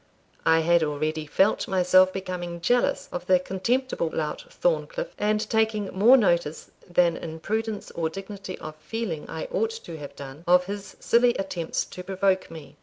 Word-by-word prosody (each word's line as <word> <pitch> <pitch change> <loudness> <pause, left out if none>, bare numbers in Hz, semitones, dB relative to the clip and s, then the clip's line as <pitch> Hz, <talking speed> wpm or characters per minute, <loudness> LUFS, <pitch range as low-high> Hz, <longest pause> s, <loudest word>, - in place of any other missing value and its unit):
I 160 0 +5
had 170 +1 +4
already 155 +1 -1
felt 195 +7 +2
myself 185 0 +5
becoming 180 -2 -5
jealous 245 +9 +1
of 180 0 -5
the 185 - +6
contemptible 190 +2 -1
lout 155 - -3
Thorncliff, - - -1
and 210 +1 +1
taking 220 -3 +1
more 230 +7 +7
notice, 170 - 0 0.2
than 175 -1 +3
in 160 -1 -7
prudence 220 +4 -3
or 165 -1 -1
dignity 195 +1 -7
of 155 0 -8
feeling 190 -2 -4
I - - -4
ought 450 -3 +1
to 450 - -8
have 145 -1 -9
done, 140 +3 -9
of 180 +1 +5
his 200 +1 -7
silly 240 +1 +3
attempts 180 -4 -2
to 180 - -9
provoke 190 0 0
me. 160 -3 -11
185 Hz, 165 wpm, -26 LUFS, 165-220 Hz, 0.2 s, more